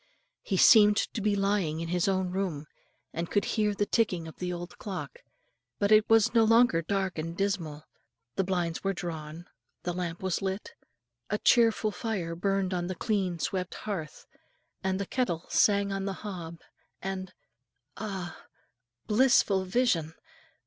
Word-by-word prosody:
He 195 - -2
seemed 210 0 +7
to 220 - -1
be 205 0 +2
lying 195 -6 0
in 165 0 -4
his 180 +1 +1
own 190 -2 0
room, 180 -6 -2 0.5
and 170 +1 -3
could 205 - +1
hear 210 -2 0
the 205 - +1
ticking 190 -8 0
of 160 - -11
the 180 0 -3
old 175 0 -7
clock; 205 - -6 0.6
but 200 0 +1
it 215 0 +6
was 225 -1 +5
no 230 -2 +5
longer 225 -6 +5
dark 190 0 -2
and 165 +2 -5
dismal, 170 -7 -2 0.5
the 195 - +1
blinds 175 -3 -2
were 195 0 +1
drawn, 160 -1 -6 0.4
the 175 - -2
lamp 175 0 -4
was 190 -2 -1
lit, 190 +1 -4 0.6
a 210 - 0
cheerful 225 -2 +3
fire 180 -4 -3
burned 195 +1 0
on 175 -1 -1
the 185 - -3
clean 195 -6 -1
swept 185 +2 -3
hearth, 170 -8 -6 0.6
and 190 0 0
the 200 - -2
kettle 180 -8 -1
sang 200 -1 +3
on 195 0 -2
the 195 - -2
hob, 170 -4 -6 0.4
and 190 -1 -5 0.6
ah, 190 -5 -6 0.6
blissful 210 -4 +3
vision! 185 -7 +1
190 Hz, 155 wpm, -29 LUFS, 175-205 Hz, 0.6 s, seemed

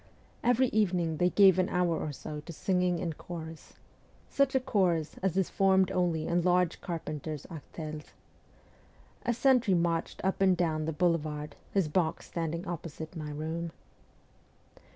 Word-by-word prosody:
Every 245 +1 +3
evening 175 -6 +1
they 180 +2 +3
gave 190 -1 +6
an 185 - +2
hour 180 -2 +1
or 150 - -3
so 150 +2 -7
to 155 - -9
singing 180 +1 +1
in 165 -1 -2
chorus 160 0 -9 0.6
such 275 -1 +2
a - - +5
chorus 180 - 0
as 190 -1 0
is 190 - +1
formed 190 -1 +3
only 175 -4 0
in 175 +1 +1
large 180 -1 +2
carpenters' 155 -4 -5
artels. 155 -1 -7 1.2
A - - +4
sentry 250 -6 +4
marched 170 -1 0
up 190 +1 0
and 190 -2 +4
down 155 -3 0
the 160 - -1
boulevard, 155 -2 -1 0.2
his 195 -5 +2
box 160 +1 0
standing 170 +2 -3
opposite 165 -1 -6
my 155 -2 -5
room. 160 +3 -3
170 Hz, 150 wpm, -30 LUFS, 160-185 Hz, 1.2 s, gave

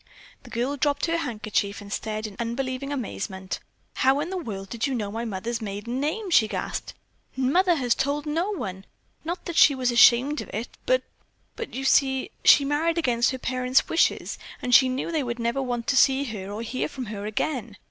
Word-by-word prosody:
The - - -14
girl 255 +5 -2
dropped 285 0 +1
her 335 0 0
handkerchief 215 -8 -2
and 200 0 -7
stared 215 0 -3
in 210 -2 -7
unbelieving 255 +3 -3
amazement. 195 -7 -4 0.4
"How 265 +2 +3
in 330 +5 -3
the - - -3
world 195 - -6
did 235 +3 -1
you 270 - -1
know 210 -4 -3
my 230 +2 -3
mother's 225 +3 -3
maiden 210 +4 -4
name?" 360 +8 -2
she 220 -9 +5
gasped. - - -4 0.4
"Mother 345 +8 +3
has 250 -5 +2
told 285 +3 -1
no 325 +6 0
one. 195 - -5 0.4
Not 345 +3 -4
that 345 - -4
she 285 - +7
was 255 -2 0
ashamed 245 +5 +5
of - - -9
it, 225 +3 -3 0.2
but—but—you 465 - -4
see, 265 -1 +3
she 280 - +7
married 315 +4 +1
against 245 -7 +2
her 260 - -3
parents' 255 0 +1
wishes 330 - +1 0.2
and 250 - -2
she 260 +1 +7
knew 260 +6 -2
they 320 -2 +1
would 240 -2 -3
never 235 +3 -1
want 245 -3 -2
to 280 - +1
see 265 -3 +3
or 210 +3 -5
hear 250 +3 -2
from 260 -2 -6
her 210 -1 -5
again. 220 -1 -3
255 Hz, 190 wpm, -25 LUFS, 225-285 Hz, 0.4 s, she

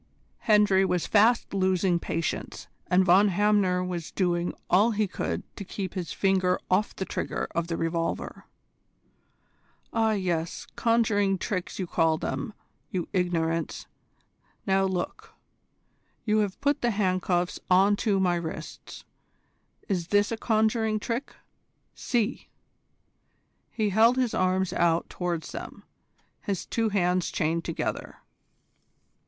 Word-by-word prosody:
Hendry 210 -3 +5
was 180 -2 0
fast 225 +2 +3
losing 185 -2 +2
patience, 165 -1 -4 0.2
and 185 +1 +3
Von 190 +4 +6
Hamner 195 -2 +2
was 175 -3 -4
doing 175 -2 0 0.2
all 205 +6 +4
he 215 -1 +1
could 190 - -3
to - - -6
keep 190 -1 -5
his 180 -3 -4
finger 185 -2 +2
off 200 +3 +1
the 190 - -3
trigger - - -3
of 170 0 -1
the 165 -1 -2
revolver. 165 0 -3 1.5
"Ah 225 -1 +2
yes, 175 -5 -2
conjuring 215 -4 +2
tricks 185 0 -3
you 185 - -2
call 165 -2 +2
them, 140 +5 -3 0.4
you 180 -2 -3
ignorants! 165 -3 -1 0.8
Now 195 -1 +2
look. 185 -2 -4 0.9
You 215 -1 +2
have 205 -3 -1
put 285 0 +1
the 240 - +2
handcuffs 185 -4 0
on 195 +3 +5
to 200 -2 +1
my 180 -2 +2
wrists. 165 -2 -7 0.8
Is 180 -5 -1
this 205 +2 +2
a - - 0
conjuring 220 -1 +1
trick? 235 +5 -4 0.6
See!" 235 -4 -2 1.2
He 215 -2 -1
held 225 +5 +4
his 250 -3 +1
arms 185 0 +1
out 170 -2 +2
towards 175 -3 -3
them, - - -8 0.6
his 195 -3 -3
two 225 -1 0
hands 180 -3 +1
chained 165 +1 -1
together. - - -4
190 Hz, 125 wpm, -27 LUFS, 175-210 Hz, 1.5 s, Von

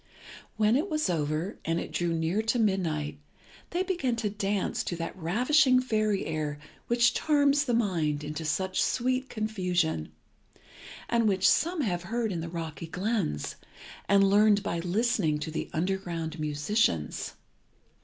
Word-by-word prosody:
When 215 +1 +3
it 315 +9 0
was 305 - 0
over, 155 +4 -2
and 165 +1 0
it - - -6
drew 175 -1 0
near 165 +5 0
to 225 +2 0
midnight, 165 -9 0 0.5
they 355 +2 0
began 345 -11 -1
to 220 -3 -2
dance 200 -1 -1
to 175 - -2
that 165 0 -5
ravishing 255 - +3
fairy 215 -5 0
air 155 -2 -2 0.3
which 235 0 +4
charms 285 -1 +3
the 245 -3 +1
mind 165 -10 0
into 150 +2 -5
such 185 +5 0
sweet 255 +1 0
confusion, 180 - -1 1.0
and 230 -1 +2
which 195 -1 +3
some 340 0 +2
have 180 -9 -1
heard 225 +4 -2
in 170 -3 -3
the 165 - -5
rocky 165 -1 -5
glens, 185 - -2 0.5
and 200 0 +6
learned 205 0 +4
by 170 -4 -2
listening 180 -3 +1
to 150 +1 -5
the 160 - -4
underground 170 -2 -2
musicians. 150 - 0
195 Hz, 145 wpm, -28 LUFS, 165-230 Hz, 1.0 s, and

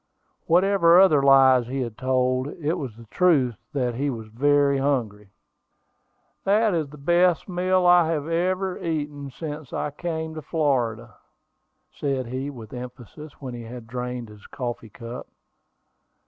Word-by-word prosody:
Whatever 175 0 +5
other 160 -7 +6
lies 135 -3 +5
he 135 +2 -3
had 120 -3 -4
told, 130 +1 0
it 155 +1 -3
was 130 -10 -5
the 115 0 -14
truth 145 -10 +3 0.2
that 125 -5 -1
he 140 +4 -1
was 110 -4 -6
very 140 +3 +2
hungry. 115 -8 -1 1.1
"That 210 +1 +3
is 160 -4 -1
the 150 - -12
best 175 +4 +2
meal 185 0 +1
I 175 -2 +5
have 155 -2 -2 0.6
eaten 145 -3 -3
since 150 0 -7
I 150 - -3
came 160 +1 -4
into 160 0 -7
Florida," 120 - -1 0.7
said 135 -3 -2
he 130 +4 -4
with 115 -5 -10
emphasis, 125 +4 -9
when 130 -3 -7
he 120 - -7
had 115 +1 -9
drained 125 0 -5
his 105 -1 -14
coffee 120 -3 -5
cup. 115 +3 -9
140 Hz, 145 wpm, -24 LUFS, 125-160 Hz, 1.1 s, other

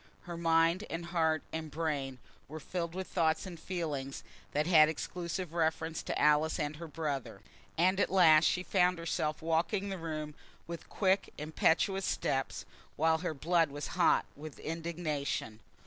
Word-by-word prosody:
Her 175 - -7
mind, 165 +2 +3
and 165 +1 -4
heart, 160 -2 +1
and 160 -1 -4
brain, 145 -4 -2 0.3
were 155 +3 -7
filled 170 +2 -4
with 190 0 -3
thoughts 160 -1 +1
and 175 -3 -8
feelings 150 -7 -4 0.3
that 150 +1 +1
had 155 -3 +6
exclusive 170 +2 -4
reference 160 -1 0
to - - -3
Alice 150 +1 +3
and 150 0 -2
her 170 +1 -7
brother, 150 -4 -4 0.4
and 185 +3 +3
at - - +2
last 165 -4 +6
she 180 - +2
found 180 -2 +2
herself 160 -2 -2
walking 170 +5 0
the 190 -2 -4
room 155 -2 -4 0.3
with 170 0 -8
quick, 195 -1 +1
impetuous 165 +5 +1
steps, 135 0 -1 0.3
while 160 +1 +3
her 170 -2 -3
blood 165 +2 +2
was 145 +1 -5
hot - - +3
with 150 0 -9
indignation. 155 -8 -3
160 Hz, 155 wpm, -32 LUFS, 155-175 Hz, 0.4 s, had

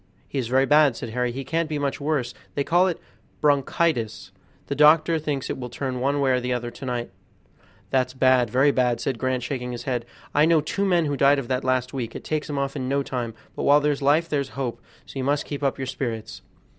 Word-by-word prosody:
"He 140 - -3
is 125 - -2
very 130 +3 +3
bad," 150 -3 +5
said 120 - -6
Harry, 125 +1 -1
"he 135 +3 -5
can't 165 +2 -1
be 155 - -2
much 145 0 -2
worse; 140 -5 -1 0.2
they 140 - +1
call 175 +5 +3
it 175 - -2 0.4
'bronchitis'; 140 -5 +1 0.3
the - - -3
doctor 155 +3 +5
thinks 145 -3 -3
it - - -4
will 125 -1 -5
turn 130 0 -4
one 140 +3 +1
way 135 -2 +2
or 125 -1 +2
another 120 -1 -2
to 120 +3 -9
night." 120 -4 -3 0.8
"That's 130 -1 +1
bad, 130 -2 +4
very 130 +5 +4
bad," 125 -3 +1
said 130 -4 -2
Grant, 130 -1 -1
shaking 125 -1 -4
his 120 - -6
head; 120 -3 -2 0.3
"I 150 +1 +5
know 165 -1 +4
two 195 +7 -1
men 175 -4 +3
who 145 -1 -1
died 140 +1 +4
of 135 -4 -4
that 130 0 0
last 130 -1 0
week; 120 -4 -4
it - - -7
takes 155 0 -2
'em 145 - -3
off 140 0 -2
in 130 -2 -3
no 140 +1 +1
time; 120 -4 -4 0.2
but - - -4
while 145 +1 +5
there's 145 -1 0
life 150 +4 +3
there's 140 -4 -1
hope, 130 -4 -3 0.2
so 135 - -8
you - - -1
must 145 +2 0
keep 145 -1 -5
up 140 -2 0
your 135 - -3
spirits." 120 -4 -4
135 Hz, 235 wpm, -24 LUFS, 125-145 Hz, 0.8 s, bad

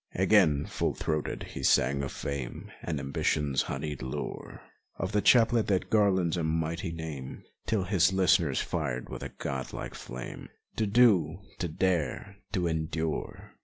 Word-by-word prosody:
Again, 90 -7 +4
full - - -1
throated, 75 -1 -2
he - - -5
sang 70 +3 +3
of 70 - -3
fame 70 -4 -5
And 80 -4 -3
ambition's 70 0 0
honeyed 75 -3 -4
lure, 65 0 -5 0.4
Of 95 - -2
the 105 0 +2
chaplet 115 -1 +5
that 95 -3 0
garlands 95 -6 +3
a 85 - -1
mighty 80 +2 -1
name, 80 -5 -6 0.2
Till 110 -4 +1
his 95 -2 +3
listeners 85 -6 +3
fired 60 0 -2
with - - -6
the - - -5
god 65 -2 -5
like - - -5
flam.e 60 0 -7 0.3
To 110 - +1
do, 105 -4 +4 0.2
to 90 - -1
dare, 95 +3 -1
to 90 -4 0
endure! 80 -1 -3
80 Hz, 150 wpm, -29 LUFS, 70-95 Hz, 0.4 s, chaplet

